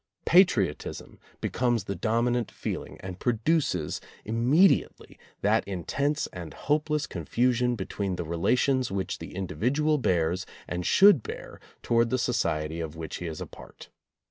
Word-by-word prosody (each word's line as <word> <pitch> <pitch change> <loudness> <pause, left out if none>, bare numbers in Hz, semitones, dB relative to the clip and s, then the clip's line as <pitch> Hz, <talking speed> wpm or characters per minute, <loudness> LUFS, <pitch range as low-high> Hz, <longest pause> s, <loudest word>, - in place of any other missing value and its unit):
Patriotism 120 - +2 0.2
be - - -1
comes 120 -4 +1
the 100 - -3
dominant 115 +5 0
feeling, - - -5
and 95 -1 -7
produces 120 - 0 0.2
immedi 125 - +4
ately - - -18 0.2
that 110 +2 +3
intense 140 - -1
and 85 -5 -8
hopeless 150 0 0
confusion 125 0 0
between 95 -2 -3
the 90 - -3
relations 125 - +1
which 95 -1 -3
the - - -9
individual 130 - 0
bears 90 -4 0 0.2
and 90 -1 -3
should 195 - +7
bear - - -8 0.2
towards 115 0 +2
the 130 - +1
society 80 -10 -1
of 80 -1 -5
which 80 -1 -6
he 90 - -5
is 80 -2 -6
a - - -4
part. - - -13
115 Hz, 145 wpm, -27 LUFS, 90-130 Hz, 0.2 s, should